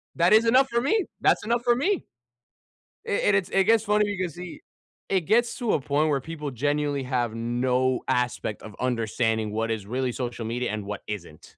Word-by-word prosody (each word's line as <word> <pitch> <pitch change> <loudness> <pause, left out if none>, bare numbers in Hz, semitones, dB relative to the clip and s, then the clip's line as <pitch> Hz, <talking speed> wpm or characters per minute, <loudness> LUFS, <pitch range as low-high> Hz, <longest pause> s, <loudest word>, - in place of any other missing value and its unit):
That 175 +4 +4
is 220 +2 +6
enough 260 +3 +4
for 235 0 +1
me 385 - +1 0.2
That's - - +3
enough 235 +1 0
for 240 -1 +3
me. 360 +10 0 1.0
It 205 - +1
it's 195 -2 +1
it 195 0 +3
gets 225 +1 +4
funny 210 0 +3
because 185 -6 -3
he 180 0 -9 0.5
it 190 -1 +2
gets 235 +8 +2
to 240 -4 +1
a - - +1
point 145 +3 +1
where 140 -2 +1
people 150 0 -6
genuinely 145 +2 -1
have 120 -3 -1
no 125 +2 0
aspect 125 -3 -1
of 105 -2 -10
understanding 110 -3 0
what 115 +1 -1
is 105 -3 -3
really 125 +2 -1
social 120 -2 -4
media 120 +1 -2
and 105 -2 -4
what 105 0 -6
isn't. 90 -7 -7
140 Hz, 190 wpm, -26 LUFS, -, 1.0 s, is